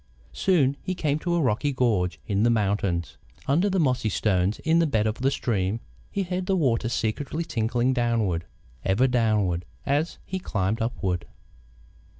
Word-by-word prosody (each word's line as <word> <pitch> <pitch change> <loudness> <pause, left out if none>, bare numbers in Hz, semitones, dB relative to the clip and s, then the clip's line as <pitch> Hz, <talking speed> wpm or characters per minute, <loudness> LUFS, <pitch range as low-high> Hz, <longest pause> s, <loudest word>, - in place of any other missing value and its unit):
Soon 140 -8 +2
he 185 - -3
came 150 -3 0
to 175 +1 -1
a - - +2
rocky 130 +3 +1
gorge 110 -9 +1
in 100 -1 0
the 120 - +4
mountains. 100 -6 0 0.3
Under 170 +9 +2
the 190 -1 +1
mossy 130 -7 +1
stones 95 -1 +1
in 165 +1 +3
the 165 - +3
bed 110 -7 +1
of 110 +1 -1
the 130 +2 +2
stream, 110 -6 -1 0.3
he 200 - -1
heard 180 0 -3
the 195 - +2
water 120 -9 +1
secretly 130 +8 -2
tinkling 120 -2 0
downward, 115 -9 0 0.4
ever 100 +7 +3
downward, 110 -8 +1 0.2
as 145 +4 0
he 190 - -3
climbed 105 - -1
upward. 95 -7 -2
120 Hz, 160 wpm, -26 LUFS, 105-150 Hz, 0.4 s, the